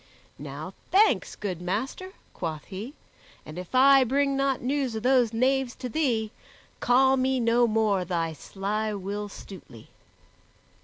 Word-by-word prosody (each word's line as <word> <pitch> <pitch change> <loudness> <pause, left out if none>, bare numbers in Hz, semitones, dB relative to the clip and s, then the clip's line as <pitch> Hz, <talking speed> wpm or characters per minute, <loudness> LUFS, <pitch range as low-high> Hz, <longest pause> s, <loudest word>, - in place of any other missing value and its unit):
"Now - - -7 0.2
thanks, 420 +3 +3
good 185 -5 -5
master," 260 - -4 0.2
quoth 160 -4 -5
he, 215 +10 -8 0.5
"and 155 +3 -8
if 180 +7 -8
I 270 +1 +7
bring 275 +2 +1
not 275 -1 +1
news 265 -2 -1
of 220 - -4
those 250 -3 +3
knaves 255 +2 +1
to 250 - -6
thee, 230 -7 0 0.5
call 265 +2 +4
me 260 0 +1
no 235 +1 +3
more 215 -4 +1
thy 165 -2 -2
sly 210 +6 -3
Will 205 +2 -5
Stutely." 180 - -12
230 Hz, 140 wpm, -26 LUFS, 195-265 Hz, 0.5 s, I